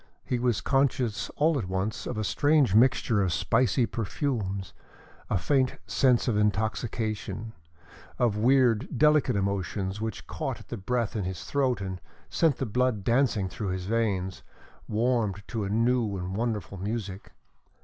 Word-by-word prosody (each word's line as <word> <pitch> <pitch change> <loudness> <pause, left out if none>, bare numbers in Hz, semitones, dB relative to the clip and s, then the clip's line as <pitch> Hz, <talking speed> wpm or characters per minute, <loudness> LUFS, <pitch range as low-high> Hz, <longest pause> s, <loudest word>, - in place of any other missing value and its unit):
He 125 - -1
was 120 -3 +1
conscious 130 -6 +1
all 155 -1 +2
at 100 - -4
once 95 +4 -2
of 120 - -4
a 110 - -1
strange 145 0 +3
mixture 115 -2 +4
of 95 -2 +1
spicy 120 +6 +2
perfumes, 105 - -3 0.6
a - - +2
faint 130 - +1
sense 125 +2 +2
of 120 - +2
intoxication, 110 +1 -1 0.6
of 120 -4 +2
weird, 125 +1 +3
delicate 150 -3 +4
emotions 100 0 -2
which 110 -2 -4
caught - - -4
at - - -15
the - - -4
breath 115 +3 -1
in 105 -4 -1
his 95 -1 -5
throat 130 -6 0
and 95 -2 -5 0.3
sent 160 -5 +2
the 135 - -2
blood 125 -2 0
dancing 115 -4 +2
through 100 +3 -5
his 95 0 -3
veins, 100 -4 -1 0.5
warmed 110 -3 0
to 110 -4 -2
a - - -3
new 115 -1 +1
and 90 +1 -4
wonderful 110 -3 -2
music. 100 -1 -5
110 Hz, 150 wpm, -27 LUFS, 100-125 Hz, 0.6 s, mixture